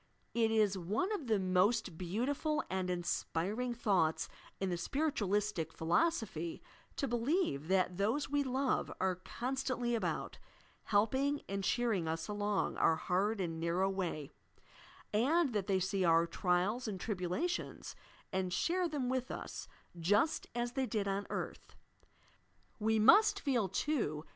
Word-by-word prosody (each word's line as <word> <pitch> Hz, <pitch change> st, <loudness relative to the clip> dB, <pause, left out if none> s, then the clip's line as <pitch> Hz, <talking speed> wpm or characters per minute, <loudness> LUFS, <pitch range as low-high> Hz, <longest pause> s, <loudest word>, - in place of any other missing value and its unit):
It 230 Hz, -1 st, +3 dB
is 210 Hz, -3 st, +2 dB
one 210 Hz, -, -1 dB
of 335 Hz, -, -3 dB
the 220 Hz, -2 st, +3 dB
most 190 Hz, +1 st, +2 dB
beautiful 250 Hz, -, -1 dB
and 185 Hz, -1 st, -1 dB
inspiring 185 Hz, +6 st, -1 dB
thoughts 190 Hz, -9 st, +1 dB, 0.3 s
in 190 Hz, -1 st, -1 dB
the -, -, +1 dB
Spiritualislic 205 Hz, -, 0 dB
Philosophy 170 Hz, -, 0 dB, 0.4 s
to 275 Hz, -, -1 dB
believe 240 Hz, -, 0 dB
that 185 Hz, -1 st, +2 dB
those 225 Hz, +9 st, +1 dB
we 290 Hz, 0 st, +1 dB
love 265 Hz, 0 st, 0 dB
are 190 Hz, 0 st, +2 dB
constantly 245 Hz, +3 st, -2 dB
about, 230 Hz, -, -2 dB, 0.5 s
helping 265 Hz, +8 st, +2 dB
and 195 Hz, 0 st, -3 dB
cheering 220 Hz, -7 st, +1 dB
us, 160 Hz, 0 st, -2 dB
along 205 Hz, -1 st, -1 dB
our 165 Hz, -, +4 dB
hard 195 Hz, +6 st, 0 dB
and 165 Hz, -3 st, -2 dB
narrow 175 Hz, +4 st, +1 dB
way; 170 Hz, -7 st, -3 dB, 0.8 s
and 275 Hz, +6 st, +3 dB
that 205 Hz, -2 st, -1 dB
they 195 Hz, -2 st, +2 dB
see 190 Hz, +1 st, 0 dB
our 165 Hz, -1 st, +5 dB
trials 185 Hz, +8 st, 0 dB
and 195 Hz, -3 st, -4 dB
tribulations, 205 Hz, -, -3 dB, 0.4 s
and 185 Hz, -1 st, 0 dB
share 350 Hz, -, +1 dB
them 285 Hz, -5 st, -2 dB
with 255 Hz, 0 st, -1 dB
us, -, -, -6 dB, 0.3 s
just 205 Hz, -, +2 dB
as 240 Hz, 0 st, -1 dB
they 265 Hz, 0 st, -1 dB
did 210 Hz, -4 st, -1 dB
on 195 Hz, +1 st, -1 dB
earth. -, -, -5 dB, 1.0 s
We 220 Hz, +1 st, +2 dB
must 410 Hz, -, +6 dB
feel, 245 Hz, -, +1 dB
too. 180 Hz, -, -1 dB
210 Hz, 140 wpm, -34 LUFS, 180-255 Hz, 1.0 s, must